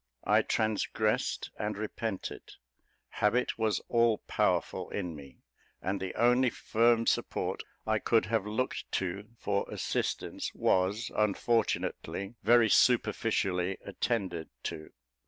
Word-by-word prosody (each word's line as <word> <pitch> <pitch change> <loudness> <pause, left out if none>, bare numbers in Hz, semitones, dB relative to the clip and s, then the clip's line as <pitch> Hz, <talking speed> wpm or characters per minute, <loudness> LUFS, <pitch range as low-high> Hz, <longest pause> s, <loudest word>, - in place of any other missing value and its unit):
I - - +5
transgressed 110 0 0
and 105 -1 -2
repented; 110 -1 -5 0.6
habit 115 +3 +1
was 110 -2 +1
all 115 -2 +3
powerful - - 0
in 90 -5 -4
me; 70 -3 -13 0.4
and 95 +1 -2
the 95 -1 -4
only 125 +2 +4
firm 115 0 +2
support - - 0 0.2
I - - +1
could - - +2
have 100 - 0
looked 115 +5 -2
to 95 +3 -2
for 100 -2 -1
assistance - - -2
was, 95 +5 +1
unfortunately, 105 -1 0
very 120 +2 +5
superficially 100 -5 +2
attended 95 -5 -2
to. 80 - -5
105 Hz, 110 wpm, -30 LUFS, 95-115 Hz, 0.6 s, I